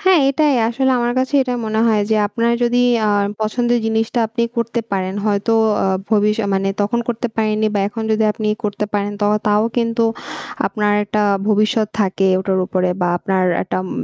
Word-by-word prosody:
হ্যাঁ, 375 Hz, -5 st, +4 dB
এটাই। 295 Hz, 0 st, +2 dB
আসলে 265 Hz, +3 st, 0 dB
আমার 240 Hz, 0 st, 0 dB
কাছে 260 Hz, +3 st, -1 dB
এটাই 250 Hz, -1 st, -3 dB
মনে 220 Hz, 0 st, 0 dB
হয় 220 Hz, -2 st, +3 dB
যে 220 Hz, -, +3 dB
আপনার 235 Hz, +2 st, 0 dB
যদি 245 Hz, 0 st, +2 dB, 0.3 s
আ -, -, +2 dB, 0.3 s
পছন্দের 240 Hz, +2 st, 0 dB
জিনিসটা 225 Hz, +2 st, -1 dB
আপনি 235 Hz, +1 st, -2 dB
করতে 235 Hz, 0 st, -1 dB
পারেন 190 Hz, 0 st, -1 dB
হয়তো 205 Hz, +2 st, 0 dB, 0.3 s
আ -, -, +1 dB, 0.2 s
ভবিষ্য 210 Hz, 0 st, +2 dB
মানে 195 Hz, 0 st, 0 dB
তখন 210 Hz, +4 st, 0 dB
করতে 240 Hz, 0 st, -2 dB
পারেননি 215 Hz, -1 st, +1 dB
বা 200 Hz, -, +1 dB
এখন 225 Hz, +1 st, -6 dB
যদি 220 Hz, 0 st, +1 dB
আপনি 215 Hz, 0 st, -3 dB, 0.2 s
করতে 210 Hz, 0 st, -2 dB
পারেন 205 Hz, 0 st, -1 dB
ত -, -, -2 dB, 0.2 s
তাও 210 Hz, 0 st, +3 dB
কিন্তু 230 Hz, 0 st, +1 dB, 0.6 s
আপনার 210 Hz, -2 st, 0 dB
একটা 210 Hz, +1 st, -1 dB, 0.3 s
ভবিষ্যৎ 215 Hz, +1 st, +2 dB
থাকে 195 Hz, -1 st, +1 dB
ওটার 190 Hz, 0 st, 0 dB
উপরে 185 Hz, -1 st, 0 dB
বা 180 Hz, -, +1 dB
আপনার 190 Hz, +1 st, 0 dB, 0.2 s
একটা 185 Hz, -, -4 dB
উম 185 Hz, -, -7 dB
220 Hz, 185 wpm, -18 LUFS, 205-235 Hz, 0.6 s, হ্যাঁ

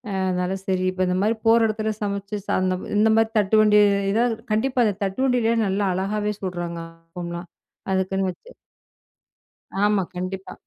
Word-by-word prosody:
அ, -, -, -1 dB
அதனால 180 Hz, +1 st, -1 dB
சரி 185 Hz, -1 st, 0 dB
இப்போ 185 Hz, 0 st, -1 dB
இந்த 180 Hz, -, 0 dB
மாரி 220 Hz, +1 st, +1 dB
போற 230 Hz, +1 st, +6 dB
இடத்துல, 215 Hz, 0 st, -2 dB
சமைச்சு 200 Hz, 0 st, -3 dB
சா -, -, 0 dB
அந்த 185 Hz, 0 st, +1 dB, 0.2 s
இந்த 220 Hz, +1 st, +4 dB
மாரி 225 Hz, 0 st, +3 dB
தட்டு 205 Hz, +2 st, +2 dB
வண்டில 210 Hz, +1 st, +4 dB, 0.3 s
கண்டிப்பா 250 Hz, +3 st, +1 dB
அந்த 205 Hz, -, 0 dB
தட்டுவண்டியிலேயே 230 Hz, +3 st, +1 dB
நல்லா 200 Hz, +1 st, 0 dB
அழகாவே 210 Hz, +2 st, -1 dB
சுட்றாங்க 175 Hz, -2 st, -4 dB, 0.3 s
ஆப்பம்லாம், 175 Hz, +1 st, -7 dB, 0.4 s
அதுக்குன்னு 190 Hz, 0 st, 0 dB
வச்சு. 450 Hz, -, -17 dB, 1.3 s
ஆமா, 205 Hz, -1 st, +3 dB
கண்டிப்பா. 185 Hz, +1 st, -5 dB
200 Hz, 145 wpm, -23 LUFS, 185-215 Hz, 1.3 s, போற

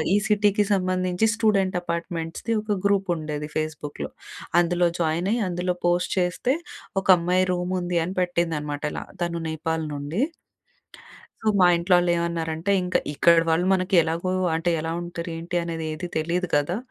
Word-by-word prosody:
ఈ -, -, +5 dB
సిటీకి 210 Hz, 0 st, +3 dB
సంబంధించి 185 Hz, +2 st, +1 dB
స్టూడెంట్ 195 Hz, -5 st, +2 dB
అపార్ట్మెంట్స్‌ది 170 Hz, +5 st, -3 dB
ఒక 210 Hz, -2 st, -1 dB
గ్రూప్ 195 Hz, -2 st, +1 dB
ఉండేది 150 Hz, -1 st, -4 dB
ఫేస్బుక్‍లో. 150 Hz, -2 st, -4 dB, 0.5 s
అందులో 175 Hz, 0 st, +2 dB
జాయిన్ 165 Hz, +4 st, 0 dB
అయి, 235 Hz, -, 0 dB
అందులో 180 Hz, 0 st, -1 dB
పోస్ట్ 175 Hz, +1 st, +1 dB
చేస్తే, 180 Hz, +10 st, +1 dB, 0.5 s
ఒక -, -, -10 dB
అమ్మాయి 180 Hz, +2 st, +2 dB
రూమ్ 180 Hz, +1 st, -2 dB
అని 175 Hz, 0 st, -1 dB
పెట్టింది 170 Hz, -2 st, 0 dB
అనమాట. 145 Hz, 0 st, -5 dB
ఇలా -, -, -5 dB, 0.2 s
తను 170 Hz, 0 st, -2 dB
నేపాల్ 160 Hz, 0 st, -2 dB
నుండి. 145 Hz, -, -3 dB, 1.2 s
సో, 220 Hz, -, +1 dB
మా 180 Hz, -, +7 dB
ఇంట్లో 175 Hz, +2 st, +2 dB
వాళ్ళు 175 Hz, 0 st, +2 dB
ఏమన్నారంటే, 170 Hz, +1 st, -1 dB
ఇంక 180 Hz, -, 0 dB, 0.2 s
ఇక్కడ 170 Hz, +3 st, +5 dB
వాళ్ళు 170 Hz, +3 st, +2 dB
మనకి 185 Hz, 0 st, +1 dB
ఎలాగో 165 Hz, +3 st, -2 dB, 0.2 s
అంటే 165 Hz, +2 st, 0 dB
ఎలా 165 Hz, +1 st, -3 dB
ఉంటారు, 175 Hz, 0 st, -5 dB
ఏంటి 175 Hz, +2 st, -4 dB
అనేది 165 Hz, -1 st, -4 dB
ఏది 175 Hz, +3 st, -5 dB
తెలీదు 170 Hz, +3 st, 0 dB
గదా! 145 Hz, +6 st, +1 dB
175 Hz, 155 wpm, -24 LUFS, 165-185 Hz, 1.2 s, మా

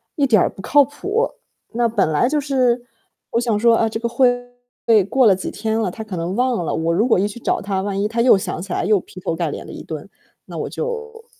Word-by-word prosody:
一 280 Hz, -2 st, +2 dB
点 215 Hz, -5 st, +5 dB
儿 -, -, +1 dB
不 190 Hz, -, -11 dB
靠 290 Hz, +7 st, +5 dB
谱。” 400 Hz, -, -1 dB, 0.5 s
那 235 Hz, 0 st, +2 dB
本 205 Hz, -8 st, +1 dB
来 240 Hz, -, +2 dB
就 300 Hz, 0 st, +1 dB
是 250 Hz, -3 st, +1 dB, 0.5 s
我 235 Hz, -, +1 dB
想 230 Hz, -4 st, +1 dB
说， 235 Hz, 0 st, +5 dB
啊， 225 Hz, -1 st, +2 dB
这 220 Hz, -, -4 dB
个 235 Hz, -, -1 dB
会 245 Hz, 0 st, +3 dB, 0.7 s
过 260 Hz, -1 st, +3 dB
了 200 Hz, -4 st, +6 dB
几 185 Hz, -, -5 dB
天 220 Hz, +1 st, -2 dB
了， 210 Hz, -5 st, 0 dB
他 220 Hz, -, -7 dB
可 205 Hz, -4 st, -7 dB
能 170 Hz, +3 st, -3 dB
忘 245 Hz, -5 st, +1 dB
了。 -, -, -2 dB
我 165 Hz, +1 st, 0 dB
如 215 Hz, +8 st, +2 dB
果 230 Hz, -, +4 dB
一 200 Hz, -, +1 dB
去 210 Hz, +3 st, -8 dB
找 -, -, 0 dB
他， 195 Hz, -1 st, -2 dB
万 200 Hz, 0 st, -2 dB
一 210 Hz, -, +1 dB
他 230 Hz, +1 st, -1 dB
又 240 Hz, -5 st, +6 dB
想 180 Hz, -4 st, -4 dB
起 190 Hz, -1 st, -8 dB
来 -, -, -1 dB
又 205 Hz, -1 st, +3 dB
劈 185 Hz, -, -12 dB
头 170 Hz, -, -2 dB
盖 -, -, -1 dB
脸 -, -, -6 dB
的 -, -, -10 dB
一 -, -, -8 dB
顿， -, -, -7 dB, 0.4 s
那 -, -, -8 dB
我 -, -, -3 dB
就 460 Hz, -1 st, -5 dB
230 Hz, 280 characters per minute, -20 LUFS, 195-255 Hz, 0.7 s, 了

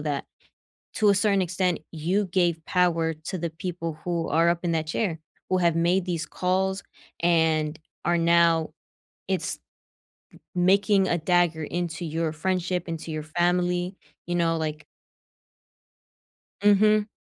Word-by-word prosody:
that 145 Hz, -2 st, -2 dB, 0.7 s
to 215 Hz, -1 st, +4 dB
a 200 Hz, -, +5 dB
certain 200 Hz, -1 st, +2 dB
extent 180 Hz, 0 st, 0 dB
you 175 Hz, +6 st, 0 dB
gave 175 Hz, -3 st, +1 dB
power 165 Hz, -3 st, +1 dB
to 160 Hz, +5 st, -6 dB
the 170 Hz, -1 st, -3 dB
people 165 Hz, -2 st, -5 dB
who 170 Hz, -2 st, -1 dB
are 165 Hz, +3 st, +3 dB
up 170 Hz, 0 st, +1 dB
in 175 Hz, -, 0 dB
that 160 Hz, -1 st, -1 dB
chair? 165 Hz, -1 st, -1 dB, 0.3 s
Who 185 Hz, -, +2 dB
have 170 Hz, -2 st, +2 dB
made 175 Hz, +2 st, +2 dB
these 170 Hz, -3 st, -2 dB
calls 190 Hz, +1 st, -1 dB, 0.4 s
and 160 Hz, -2 st, +2 dB, 0.3 s
are 175 Hz, 0 st, +2 dB
now 170 Hz, -1 st, +3 dB, 0.6 s
it's -, -, -2 dB, 1.0 s
making 195 Hz, +2 st, +3 dB
a 175 Hz, -, +1 dB
dagger 170 Hz, -1 st, +2 dB
into 175 Hz, +1 st, -3 dB
your 165 Hz, 0 st, -1 dB
friendship, 180 Hz, +1 st, -2 dB
into 165 Hz, 0 st, -5 dB
your 155 Hz, -1 st, -4 dB
family, 175 Hz, +2 st, 0 dB, 0.3 s
you 175 Hz, -, -1 dB
know, 165 Hz, -1 st, +2 dB
like 155 Hz, -1 st, -4 dB, 1.8 s
Mhm. 210 Hz, +1 st, +4 dB
175 Hz, 135 wpm, -25 LUFS, 160-185 Hz, 1.8 s, a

